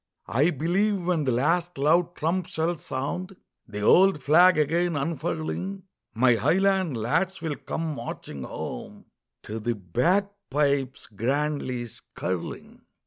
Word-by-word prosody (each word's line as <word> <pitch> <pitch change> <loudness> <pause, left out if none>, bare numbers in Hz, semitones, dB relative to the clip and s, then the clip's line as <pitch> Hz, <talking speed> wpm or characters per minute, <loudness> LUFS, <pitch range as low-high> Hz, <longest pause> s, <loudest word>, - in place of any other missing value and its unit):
I 140 +8 +2
believe 180 +5 0
when 170 -4 +1
the 130 - +2
last 165 +8 +1
loud 170 +5 +2
trump 170 +3 -1
shall 165 +2 -1
sound, 165 +7 -4 0.3
The 105 -1 -6
old 180 - +5
flag 175 +5 +6
again 165 +3 +1
unfurling, 170 +5 -3 0.3
My 120 0 +4
highland 185 - +2
lads 165 - 0
will 160 -3 -3
come 155 +3 -4
marching 115 - -7
home 60 - -7 0.4
To 110 +1 -5
the 120 +2 -1
bagpipes 140 - 0
grandly 130 +2 -2
skirling. 95 -5 -6
155 Hz, 120 wpm, -26 LUFS, 130-180 Hz, 0.4 s, flag